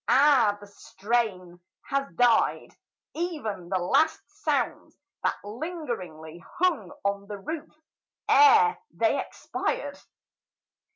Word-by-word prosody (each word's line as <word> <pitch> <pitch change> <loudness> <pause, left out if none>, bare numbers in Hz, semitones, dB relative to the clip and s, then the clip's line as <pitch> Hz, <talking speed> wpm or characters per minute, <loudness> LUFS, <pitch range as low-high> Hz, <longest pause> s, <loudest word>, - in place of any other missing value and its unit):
Ah, 260 -7 +5
the 205 - -12
strain 200 -3 -3 0.3
Has 275 0 -1
died 245 -2 +3 0.4
ev'n 285 - -4
the 190 - +1
last 300 - +2 0.2
sounds - - -1 0.2
that - - +1
lingeringly 205 - -6
Hung 320 - +1
on 200 0 -1
the 205 -1 -6
roof 310 +10 -6 0.5
ere 440 +1 +6
they - - +1
expired! - - -4
230 Hz, 100 wpm, -27 LUFS, 195-310 Hz, 0.5 s, ere